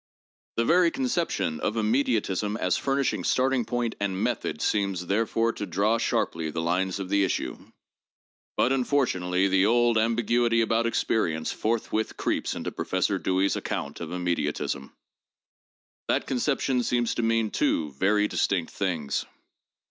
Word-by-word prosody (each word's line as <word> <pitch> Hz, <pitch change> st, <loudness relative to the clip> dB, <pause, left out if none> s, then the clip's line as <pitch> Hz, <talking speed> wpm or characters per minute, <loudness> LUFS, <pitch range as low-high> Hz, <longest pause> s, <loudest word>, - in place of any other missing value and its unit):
The 115 Hz, -, +1 dB
very 175 Hz, +3 st, +5 dB
conception 175 Hz, -, -1 dB
of 105 Hz, +6 st, -1 dB
immediatism 110 Hz, -3 st, 0 dB
as 90 Hz, -4 st, +1 dB
furnishing 135 Hz, -8 st, 0 dB
starting 130 Hz, +1 st, +1 dB
point 120 Hz, 0 st, -1 dB
and 95 Hz, -2 st, -1 dB
method -, -, -1 dB
seems 100 Hz, -4 st, 0 dB
therefore 115 Hz, +4 st, +1 dB
to 105 Hz, -, -5 dB
draw 100 Hz, +6 st, +1 dB
sharply 80 Hz, -7 st, -1 dB
the 75 Hz, -, -4 dB
lines 90 Hz, +3 st, 0 dB
of 95 Hz, -, -4 dB
the 100 Hz, 0 st, +3 dB
issue. 95 Hz, -, -1 dB, 1.0 s
But 130 Hz, -, +3 dB
unfortunately 100 Hz, -9 st, +1 dB
the 95 Hz, +1 st, +3 dB
old 120 Hz, 0 st, +3 dB
ambiguity 115 Hz, +1 st, +2 dB
about 115 Hz, +1 st, +1 dB
experience 80 Hz, -8 st, 0 dB
forthwith 110 Hz, -1 st, -1 dB
creeps -, -, -1 dB
into -, -, -4 dB
Professor -, -, -1 dB
Dewey's 95 Hz, +1 st, +1 dB
account 70 Hz, -, -4 dB
of 85 Hz, -, -5 dB
immediatism. 85 Hz, -6 st, -2 dB, 1.2 s
That -, -, +1 dB
con 130 Hz, -, -2 dB
ception 135 Hz, -2 st, +1 dB
seems 120 Hz, -1 st, 0 dB
to -, -, -2 dB
mean 115 Hz, -1 st, +1 dB
two 75 Hz, -2 st, 0 dB
very 105 Hz, +9 st, +2 dB
distinct 90 Hz, -5 st, -1 dB
things. 85 Hz, -8 st, -2 dB
105 Hz, 140 wpm, -26 LUFS, 90-120 Hz, 1.2 s, very